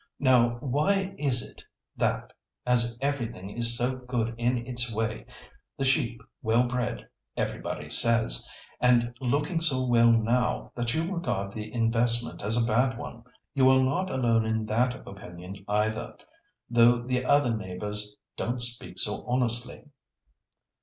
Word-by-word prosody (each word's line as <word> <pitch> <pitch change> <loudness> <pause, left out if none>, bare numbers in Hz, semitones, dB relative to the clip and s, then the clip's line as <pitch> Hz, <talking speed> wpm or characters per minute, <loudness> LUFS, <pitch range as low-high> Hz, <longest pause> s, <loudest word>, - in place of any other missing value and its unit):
Now, 120 -3 +3
why 185 +9 +1
is 130 -5 +3
it - - -12 0.3
that, - - -1 0.3
as 120 -1 +2
everything 120 -9 -3
is 115 +1 -2
so 125 +2 -1
good 125 -2 -2
in 120 0 0
its 120 -1 0
way, 115 0 -3 0.5
the 135 - -1
sheep 130 -4 +1 0.2
well 115 +3 +3
bred, 120 -1 -3 0.3
everybody - - -3
says, 115 -1 +2 0.3
and 120 -1 +3
looking 145 +7 0
so 130 -6 +2
well 115 -1 +5
now, 120 +2 +1
that 120 -1 -1
you 160 - +1
regard 100 - -2
the 110 0 -6
investment 115 +1 +1
as 110 +4 +1
a 115 - +2
bad 125 +2 +2
one? 115 -1 -8 0.3
You 130 -2 +5
are 130 0 +5
not 145 +9 0
alone 120 -3 +2
in 110 0 -1
that 125 +4 -1
opinion 90 0 -9
either, 110 +2 -1 0.5
though 120 0 +5
the 125 +1 -1
other 130 -3 +3
neighbours 105 +1 -4 0.2
don't 120 +1 -2
speak 120 0 -4
so - - -1
honestly." 120 0 0
120 Hz, 140 wpm, -27 LUFS, 115-130 Hz, 0.5 s, well